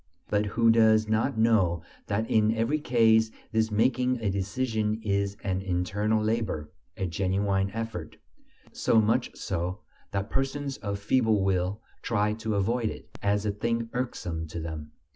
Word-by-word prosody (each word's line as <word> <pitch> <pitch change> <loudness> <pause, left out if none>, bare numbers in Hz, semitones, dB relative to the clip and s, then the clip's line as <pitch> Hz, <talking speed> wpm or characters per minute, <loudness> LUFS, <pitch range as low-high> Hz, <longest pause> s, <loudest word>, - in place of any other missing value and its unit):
But 105 0 +1
who 115 -1 +6
does 110 -1 +5
not 110 +4 +1
know 95 -7 +3 0.2
that 110 +2 -1
in 110 0 +3
every 115 +7 +1
case 110 -5 +4 0.2
this 110 -1 +2
making 125 +3 +2
a 105 -3 0
decision 105 +2 -1
is 100 -1 0
an 95 -1 -1
internal 100 +4 0
labor, 110 -9 -1 0.3
a 95 - -1
genuine 95 +2 0
effort; 110 -7 -5 0.5
so 115 - +3
much 115 +3 +2
so 90 +2 -3 0.3
that 100 +1 -3
persons 135 0 -2
of 100 -1 -3
feeble 110 -1 +2
will 95 +2 0 0.2
try 105 -2 +1
to 110 0 -3
avoid 115 +3 +1
it, - - -10
as 100 +1 +1
a 105 - +1
thing 115 +2 -2
irksome 85 -10 -3
to 80 +2 -6
them. 80 -2 -6
105 Hz, 150 wpm, -28 LUFS, 95-115 Hz, 0.5 s, who